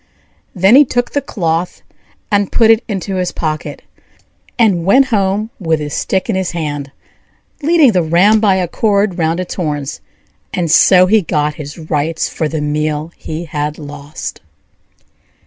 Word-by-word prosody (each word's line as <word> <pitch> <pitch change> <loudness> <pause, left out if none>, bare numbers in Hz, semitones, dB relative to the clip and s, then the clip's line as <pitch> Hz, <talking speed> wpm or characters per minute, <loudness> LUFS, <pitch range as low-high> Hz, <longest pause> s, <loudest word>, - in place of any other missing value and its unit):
Then 190 +5 +5
he 285 - +8
took 245 -2 -2
the 285 - 0
cloth 170 -5 -3 0.5
and 205 -1 +1
put 225 -1 +4
it 225 +2 +3
into 195 -3 -3
his 180 -1 -1
pocket, 155 -2 -4 0.7
and 205 -8 +2
went 260 +9 +4
home 205 +2 0
with 165 -4 0
his 145 -1 -5
stick 190 -1 -1
in - - -1
his 190 -2 -2
hand, 145 -4 -4 0.7
leading 310 -3 +4
the 185 -4 +2
ram 180 +7 +4
by 205 -3 +3
a 185 -2 0
cord 200 -1 0
round 165 +1 0
its 185 - -4
horns; 150 -5 -4 0.5
and 170 -4 -1
so 180 +1 +6
he 215 +3 +3
got 150 -3 -1
his 145 +2 -9
rights 155 0 -2
for 155 - -2
the 155 -1 -3
meal 150 +1 -2
he 160 +2 -6
had 150 -1 -3
lost. 145 -1 -8
175 Hz, 160 wpm, -15 LUFS, 155-205 Hz, 0.7 s, he